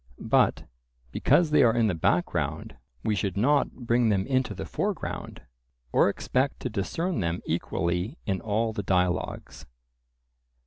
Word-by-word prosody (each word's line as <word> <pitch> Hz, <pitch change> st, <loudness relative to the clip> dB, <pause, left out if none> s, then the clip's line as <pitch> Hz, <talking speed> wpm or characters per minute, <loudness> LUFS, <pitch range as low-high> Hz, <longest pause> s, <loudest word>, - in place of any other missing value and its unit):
But -, -, +2 dB, 0.5 s
because 165 Hz, -, +3 dB
they 150 Hz, -, +5 dB
are 115 Hz, -3 st, +4 dB
in 115 Hz, -1 st, +3 dB
the 105 Hz, -, +1 dB
background, 80 Hz, -, -1 dB, 0.3 s
we 110 Hz, -, +1 dB
should 95 Hz, 0 st, -2 dB
not 140 Hz, +7 st, +3 dB
bring 120 Hz, 0 st, +3 dB
them 95 Hz, -2 st, +1 dB
into 130 Hz, -1 st, 0 dB
the -, -, -5 dB
foreground, -, -, -4 dB, 0.5 s
or -, -, +4 dB
expect 130 Hz, +2 st, -1 dB
to -, -, -3 dB
discern 165 Hz, -, -2 dB
them 85 Hz, -1 st, -2 dB
equally 90 Hz, -, -2 dB
in 95 Hz, -2 st, -1 dB
all 110 Hz, +1 st, 0 dB
the 105 Hz, -, -3 dB
dialogues. 90 Hz, -6 st, -1 dB
110 Hz, 140 wpm, -27 LUFS, 95-125 Hz, 0.5 s, they